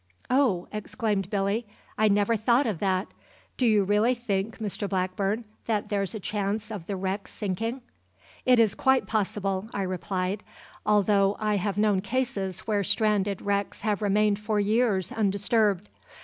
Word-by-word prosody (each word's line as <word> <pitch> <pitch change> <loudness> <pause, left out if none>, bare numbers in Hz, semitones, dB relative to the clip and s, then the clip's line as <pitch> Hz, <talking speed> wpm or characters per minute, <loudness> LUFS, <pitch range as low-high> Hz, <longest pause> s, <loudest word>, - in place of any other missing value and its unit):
"Oh!" 250 -10 +2
exclaimed 210 -2 -2
Billy, 205 +3 0 0.3
"I 215 - +3
never 205 +2 +3
thought 235 +5 +3
of 205 -8 -2
that. 190 -1 0 0.5
Do 250 - +2
you 210 -3 +4
really 210 +5 +3
think, 220 -3 -2
Mr 205 -2 -3
Blackburn, 195 +4 -1 0.2
that 215 -2 -1
there's 200 0 -1
a - - -4
chance 210 +2 -2
of 195 -6 -6
the 200 - -2
wreck 190 +1 -3
sinking?" 225 +6 -3 0.6
"It 250 -2 +5
is 220 -3 +4
quite 265 -5 +2
possible," 195 -1 -1
I 200 - 0
replied, 185 +2 -2 0.5
"although 205 -1 +3
I 210 -1 +1
have 200 +1 -2
known 210 -2 +3
cases 200 -4 -2
where 210 -2 0
stranded 205 -1 +1
wrecks 200 0 -1
have 210 -1 0
remained 205 0 +2
for 210 0 0
years 205 -3 +1
undisturbed. 205 -1 +1
205 Hz, 150 wpm, -27 LUFS, 195-220 Hz, 0.6 s, It